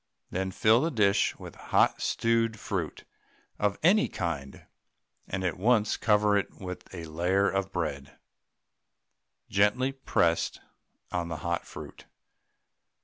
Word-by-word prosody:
Then 95 Hz, +1 st, -1 dB
fill 110 Hz, +5 st, +4 dB
the 165 Hz, -, +1 dB
dish 100 Hz, -8 st, +2 dB
with -, -, -10 dB
hot -, -, +1 dB
stewed 115 Hz, -1 st, +1 dB
fruit 95 Hz, -8 st, -4 dB, 0.6 s
of 105 Hz, -1 st, +1 dB
any 200 Hz, +6 st, +5 dB
kind, 75 Hz, -7 st, -4 dB, 0.6 s
and 95 Hz, 0 st, -3 dB
at 90 Hz, -2 st, -1 dB
once 110 Hz, +1 st, +3 dB
cover 105 Hz, -1 st, +3 dB
it 100 Hz, -, 0 dB
with 90 Hz, -2 st, -8 dB
a 85 Hz, -3 st, -7 dB
layer 90 Hz, +5 st, +1 dB
of 95 Hz, +1 st, -1 dB
bread, 70 Hz, -6 st, -4 dB, 1.3 s
gently 105 Hz, +7 st, +2 dB
pressed 85 Hz, -11 st, 0 dB, 0.5 s
on 85 Hz, -1 st, -1 dB
the 85 Hz, -1 st, -4 dB
hot 85 Hz, 0 st, -1 dB
fruit. -, -, -10 dB
95 Hz, 125 wpm, -28 LUFS, 85-110 Hz, 1.3 s, any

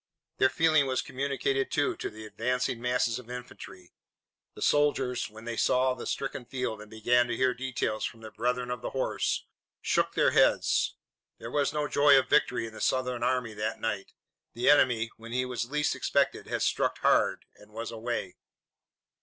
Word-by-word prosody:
Their 130 Hz, -, +5 dB
feeling 155 Hz, 0 st, +3 dB
was 130 Hz, -1 st, 0 dB
communicated, 135 Hz, 0 st, -1 dB
too, 145 Hz, -1 st, 0 dB
to -, -, -4 dB
the 110 Hz, 0 st, -10 dB
advancing 125 Hz, +2 st, -2 dB
masses 125 Hz, -2 st, 0 dB
of 120 Hz, -1 st, -13 dB
infantry. 125 Hz, -7 st, -9 dB, 0.6 s
The -, -, -11 dB
soldiers, 135 Hz, -4 st, +1 dB
when 110 Hz, +1 st, -12 dB
they 120 Hz, 0 st, -3 dB
saw 130 Hz, +2 st, +3 dB
the 125 Hz, -, -7 dB
stricken 135 Hz, -2 st, -3 dB
field 120 Hz, -4 st, -4 dB
and 105 Hz, -, -12 dB
began 120 Hz, +3 st, +2 dB
to 120 Hz, -1 st, -3 dB
hear 130 Hz, -1 st, +2 dB
details 125 Hz, -4 st, -2 dB
from 115 Hz, -, -4 dB
their 110 Hz, -1 st, -9 dB
brethren 125 Hz, +2 st, -1 dB
of 125 Hz, -2 st, -4 dB
the -, -, -3 dB
horse, 130 Hz, -, -1 dB, 0.3 s
shook -, -, 0 dB
their -, -, +4 dB
heads. -, -, +3 dB, 0.4 s
There 115 Hz, -, -8 dB
was 145 Hz, 0 st, +1 dB
no 150 Hz, 0 st, -1 dB
joy 145 Hz, -1 st, +5 dB
of 135 Hz, -, +1 dB
victory 125 Hz, -2 st, +2 dB
in 110 Hz, -, -9 dB
the -, -, -9 dB
Southern 125 Hz, -2 st, 0 dB
army 125 Hz, -2 st, 0 dB
that 105 Hz, +1 st, -3 dB
night. 105 Hz, -3 st, -3 dB, 0.4 s
The 120 Hz, +4 st, +4 dB
enemy, 120 Hz, -6 st, +3 dB
when 115 Hz, +1 st, -9 dB
he 125 Hz, +1 st, +1 dB
was 125 Hz, -1 st, -3 dB
least 150 Hz, +1 st, 0 dB
expected, -, -, 0 dB
had -, -, -1 dB
struck -, -, +1 dB
hard -, -, +2 dB
and 105 Hz, +1 st, -18 dB
was 115 Hz, +2 st, -5 dB
away. 115 Hz, -4 st, -4 dB
125 Hz, 180 wpm, -29 LUFS, 115-130 Hz, 0.6 s, Their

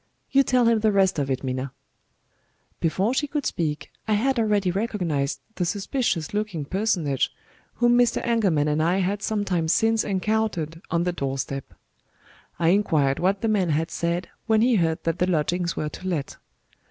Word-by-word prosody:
You 275 Hz, -, +6 dB
tell 250 Hz, -2 st, +2 dB
him 230 Hz, -1 st, +4 dB
the 215 Hz, 0 st, +2 dB
rest 190 Hz, -4 st, +2 dB
of 140 Hz, -1 st, -1 dB
it, 130 Hz, 0 st, -1 dB
Minna." 130 Hz, 0 st, -3 dB, 1.1 s
Before 190 Hz, +8 st, +1 dB
she 295 Hz, +2 st, 0 dB
could 290 Hz, -1 st, -3 dB
speak, 155 Hz, -3 st, -2 dB, 0.2 s
I 215 Hz, -, +2 dB
had 250 Hz, +4 st, +1 dB
already 205 Hz, -4 st, +2 dB
recognized 175 Hz, -9 st, -1 dB, 0.2 s
the 180 Hz, -, 0 dB
suspicious 195 Hz, -, -1 dB
looking 210 Hz, -8 st, -2 dB
personage 175 Hz, -, 0 dB, 0.5 s
whom 240 Hz, 0 st, +4 dB
Mr. 240 Hz, -1 st, +3 dB
Engelman 195 Hz, -11 st, +2 dB
and 150 Hz, +1 st, +1 dB
I 170 Hz, +4 st, +2 dB
had 195 Hz, +2 st, 0 dB
some 205 Hz, 0 st, -1 dB
time 175 Hz, -4 st, 0 dB
since 225 Hz, +6 st, +2 dB
encountered 190 Hz, -5 st, -1 dB
on 170 Hz, 0 st, +1 dB
the 180 Hz, 0 st, -1 dB
door 135 Hz, -4 st, -3 dB
step. 135 Hz, 0 st, -5 dB, 0.8 s
I 165 Hz, -1 st, +2 dB
inquired 155 Hz, -8 st, +2 dB
what 190 Hz, +2 st, +1 dB
the 225 Hz, -, 0 dB
man 200 Hz, -5 st, +1 dB
had 160 Hz, +2 st, 0 dB
said 170 Hz, +1 st, -1 dB, 0.2 s
when 220 Hz, -1 st, +4 dB
he 245 Hz, -2 st, +4 dB
heard 165 Hz, -3 st, 0 dB
that 165 Hz, +1 st, -1 dB
the 180 Hz, -, +2 dB
lodgings 170 Hz, +1 st, 0 dB
were 150 Hz, -, -2 dB
to 185 Hz, -, -8 dB
let. 155 Hz, -7 st, -3 dB
185 Hz, 180 wpm, -24 LUFS, 160-215 Hz, 1.1 s, You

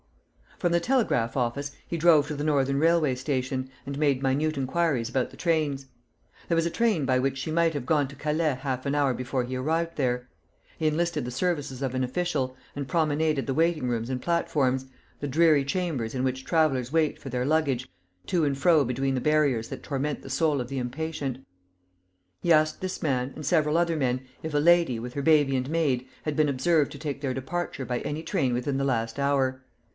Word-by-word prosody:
From 175 Hz, -, 0 dB
the 170 Hz, -, +3 dB
telegraph 170 Hz, -, +1 dB
office 135 Hz, +3 st, -1 dB, 0.2 s
he 170 Hz, -, -3 dB
drove 155 Hz, -3 st, +5 dB
to 150 Hz, -, -4 dB
the 145 Hz, -, -3 dB
Northern 140 Hz, -2 st, +1 dB
Railway 165 Hz, -3 st, +3 dB
Station, 130 Hz, -1 st, -2 dB, 0.2 s
and 140 Hz, 0 st, -5 dB
made 140 Hz, -4 st, +2 dB
minute 145 Hz, +4 st, +1 dB
inquiries 135 Hz, -3 st, 0 dB
about 125 Hz, +1 st, 0 dB
the -, -, -14 dB
trains. 150 Hz, -5 st, 0 dB, 0.6 s
There 170 Hz, -, +1 dB
was 165 Hz, 0 st, +2 dB
a -, -, -3 dB
train 220 Hz, -, +1 dB
by 130 Hz, -1 st, +2 dB
which 135 Hz, +1 st, 0 dB
she 145 Hz, +4 st, -4 dB
might 165 Hz, 0 st, +2 dB
have 145 Hz, -4 st, -4 dB
gone 145 Hz, 0 st, +2 dB
to 145 Hz, -, -11 dB
Calais 150 Hz, 0 st, 0 dB
half 130 Hz, -1 st, -3 dB
an 140 Hz, -, 0 dB
hour 140 Hz, -3 st, +2 dB
before 125 Hz, +1 st, -2 dB
he 125 Hz, +1 st, -4 dB
arrived 165 Hz, +6 st, -1 dB
there. 125 Hz, -3 st, 0 dB, 0.5 s
He 155 Hz, -, 0 dB
enlisted 170 Hz, +1 st, 0 dB
the 125 Hz, -, -4 dB
services 140 Hz, -2 st, -2 dB
of 130 Hz, -2 st, -2 dB
an 130 Hz, -, 0 dB
official, 130 Hz, -2 st, -1 dB, 0.2 s
and 140 Hz, -1 st, -4 dB
promenaded 155 Hz, -3 st, +1 dB
the 135 Hz, -, -2 dB
waiting 160 Hz, -4 st, +1 dB
rooms 115 Hz, 0 st, -2 dB
and 130 Hz, -1 st, -2 dB
platforms, 135 Hz, -6 st, +1 dB, 0.3 s
the 145 Hz, -, -3 dB
dreary 150 Hz, 0 st, +4 dB
chambers 140 Hz, -8 st, -2 dB
in 130 Hz, -, -1 dB
which 130 Hz, 0 st, -2 dB
travellers 140 Hz, -7 st, +1 dB
wait 160 Hz, -2 st, +1 dB
for 135 Hz, -, -8 dB
their 125 Hz, 0 st, -1 dB
luggage, 140 Hz, -4 st, +1 dB, 0.4 s
to 175 Hz, -3 st, +1 dB
and 140 Hz, -2 st, +1 dB
fro 160 Hz, 0 st, +4 dB
between 135 Hz, +2 st, -1 dB
the 130 Hz, -, -1 dB
barriers 145 Hz, -7 st, +2 dB
that -, -, -7 dB
torment 145 Hz, 0 st, -2 dB
the -, -, -10 dB
soul 145 Hz, 0 st, +1 dB
of 120 Hz, -, -5 dB
the 135 Hz, +1 st, -3 dB
impatient. 135 Hz, 0 st, -4 dB, 1.0 s
He 170 Hz, -, +4 dB
asked 155 Hz, 0 st, +2 dB
this 185 Hz, 0 st, -4 dB
man, 130 Hz, -3 st, 0 dB
and 155 Hz, -, -7 dB
several 155 Hz, -2 st, +2 dB
other 170 Hz, -1 st, +2 dB
men, 130 Hz, -4 st, 0 dB, 0.2 s
if 160 Hz, -1 st, -4 dB
a -, -, +2 dB
lady, 170 Hz, -6 st, +4 dB
with 125 Hz, +2 st, -6 dB
her 140 Hz, -, -3 dB
baby 145 Hz, -3 st, +4 dB
and 130 Hz, +1 st, -1 dB
maid, 140 Hz, -6 st, 0 dB, 0.2 s
had 155 Hz, -2 st, -2 dB
been 155 Hz, -2 st, +3 dB
observed 145 Hz, +3 st, +2 dB
to -, -, -9 dB
take 145 Hz, -3 st, -4 dB
their 135 Hz, -3 st, -1 dB
departure 135 Hz, +1 st, -3 dB
by 125 Hz, -1 st, -2 dB
any 150 Hz, +2 st, -4 dB
train 130 Hz, -5 st, 0 dB
within 130 Hz, +3 st, -1 dB
the 135 Hz, -, 0 dB
last 115 Hz, -3 st, -1 dB
hour. 135 Hz, -2 st, +1 dB
140 Hz, 210 wpm, -27 LUFS, 130-160 Hz, 1.0 s, drove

